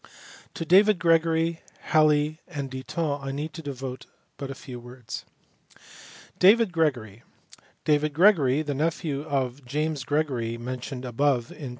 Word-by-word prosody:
To 165 - -4
David 200 +4 +5
Gregory, 165 -1 +2 0.2
Halley, 155 0 +3
and 140 -2 -5
Ditton 145 +3 -3
I 135 0 -4
need 150 +3 -4
devote 135 -5 -6 0.3
but 140 -1 -5
few 125 -2 -9
words. 120 -2 -8 1.1
David 210 +2 +6
Gregory. 125 - -1 0.6
David 150 0 +2
Gregory, 155 -5 +4
the 145 -1 -2
nephew 155 0 -1
of 135 -4 -2
the - - -19
James 150 +2 -2
Gregory 130 -6 -1
mentioned 125 +1 -6
above 125 0 0
on - - -12
p. 140 -4 -5
145 Hz, 130 wpm, -26 LUFS, 130-160 Hz, 1.1 s, David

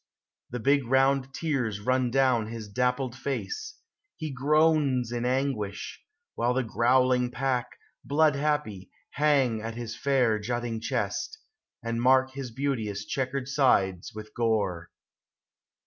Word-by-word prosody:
The 125 - -4
big 140 +1 +2
round 135 +1 +2
tears 135 -8 -2
run 130 +3 +1
down 125 -3 +2
his 110 -1 -7
dappled 125 +3 -1
face; 430 - -4 0.4
He 155 -2 -4
groans 140 -3 +2
in 120 0 -2
anguish; 125 -6 -2 0.3
while 120 +1 0
the 130 - +1
growling 125 +2 +2
pack, 125 -1 -2 0.3
Blood 150 +2 +3
happy, 140 -10 -2 0.2
hang 140 -6 +2
at 115 +1 -5
his 115 -1 -5
fair 125 -6 +2
jutting 120 +1 -3
chest, 115 - -2 0.5
And 115 0 -2
mark 130 +1 +4
his 135 -1 -6
beauteous 110 -6 -2
checkered 130 0 -2
sides 100 -10 +2
with 110 0 -9
gore. 100 -8 0
125 Hz, 125 wpm, -27 LUFS, 115-135 Hz, 0.5 s, mark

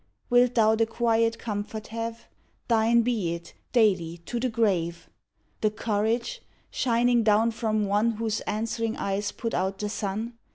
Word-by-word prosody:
Wilt 245 0 +4
thou 220 -2 +5
the 225 0 +2
quiet 230 0 +1
comfort 215 0 -5
have? 230 +1 -5 0.4
Thine 230 0 +4
be 215 -9 0
it, 170 - -11 0.2
daily, 185 -8 +2
to 240 - -3
the 255 +1 0
grave! 185 -7 0 0.5
The 215 - +3
courage, 225 - -1 0.3
shining 240 0 +2
down 220 +1 +3
from 215 -2 0
one 210 +3 +2
Whose 220 -1 -2
answering 225 +1 -2
eyes 200 +1 -1
put 230 - -4
out 190 +2 -1
the 210 +1 -3
sun? 215 +3 -4
225 Hz, 150 wpm, -26 LUFS, 205-230 Hz, 0.5 s, thou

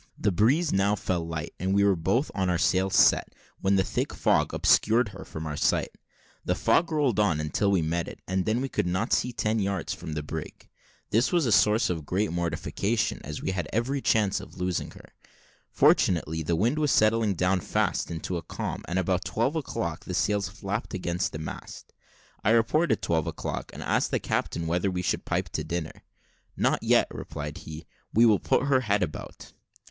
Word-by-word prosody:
The 105 - +1
breeze 130 - +2
now 100 +2 +2
fell 90 -4 -2
light, 80 0 -5
and 95 +2 0
we 100 - +4
were 100 -1 +4
both 115 - 0
with 95 -2 0
our 90 - +2
sails 95 +2 +1
set, - - +4 0.2
when 95 0 +2
a 95 - +3
thick - - -2
fog - - +2
obscured 115 +1 +3
her - - -10
from 80 0 -7
our 75 -1 -4
sight. 75 - +1 0.5
The - - 0
fog 170 0 +2
rolled 140 -9 +1
on 100 -7 +3
till 100 - +1
we 95 -4 +2
met 85 +2 -1
it, - - -9
and 95 0 0
then 110 +3 +1
we 135 - -1
could 110 - -1
not 95 +6 0
see 125 - +1
ten 110 -1 0
yards 100 -1 -2
from 80 - -7
the 75 0 -3
brig. 80 +1 -7 0.4
This 115 +4 +2
was 175 -4 +2
a 115 - +1
source 105 +2 +4
of 80 -4 -5
great 100 +2 0
mortification, 85 +6 -1
as 75 +2 -6
we - - 0
had 90 -4 -3
every 130 +6 -1
chance 105 -5 +2
of 90 -2 -12
losing 90 -1 -2
her. - - -16 0.6
Fortunately, 80 -2 +3
the 85 +2 0
wind 120 - +1
was 150 -3 +2
settling 110 -1 +3
down 90 +2 +1
fast - - -1
into 85 +2 -4
a - - -4
calm, - - -5
and 90 - -2
about 95 0 0
twelve 125 +8 -1
o'clock 85 - -3
the - - -4
sails 105 -1 +1
flapped 100 +2 -4
against 90 -1 -2
the - - -5
mast. 80 - -8 0.5
I - - +2
reported 115 +4 +2
twelve 80 -2 0
o'clock, - - -4
and - - -8
asked - - +1
the - - +1
captain 85 - -2
whether 90 +4 0
we 90 -1 -3
should - - -1
pipe - - -1
to - - -3
dinner. 80 -1 -5 0.6
"Not - - +1
yet," - - +4
replied 75 -1 -6
he, 80 +1 -9 0.3
"we 115 +2 +5
will 105 -4 +5
put - - +1
her 140 -2 +3
head 100 -4 +1
about." 75 -4 -7
95 Hz, 200 wpm, -27 LUFS, 85-110 Hz, 0.6 s, we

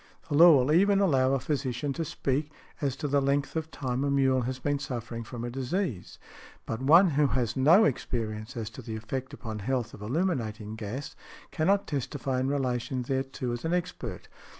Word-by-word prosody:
The 145 - 0
law 165 +1 +9
will 130 +3 +2
even 195 +4 +4
allow 135 -9 +3
a 135 - +2
physician 135 0 -2
to 165 - -2
speak 145 0 -2 0.3
as 140 -3 0
to 145 - -3
the 140 0 +2
length 140 +2 0
of 160 0 -2
time 130 -3 -2
a 140 - +1
mule 135 -2 +3
has 125 +2 -3
been 145 +2 -1
suffering 120 -3 -5
from 120 +1 -7
a 120 - -4
disease. 135 - -3 0.5
But 110 +2 -4
one 165 +7 +6
who 145 0 +3
has 120 -1 0
had 130 - -2
no 175 +10 +7
experience 115 -2 -2
as 110 -1 -4
to - - -9
the 110 -2 -6
effect 125 +4 -5
upon 110 -2 -6
health 120 +1 -2
of - - -11
illuminating 110 - -2
gas 110 +6 -6 0.4
cannot 195 +6 +2
testify 135 -2 -2
in 130 - 0
relation 130 -2 -1
thereto 130 -1 -2
as 120 - -5
an 165 +2 +1
expert. 165 - -4
130 Hz, 195 wpm, -28 LUFS, 120-145 Hz, 0.5 s, law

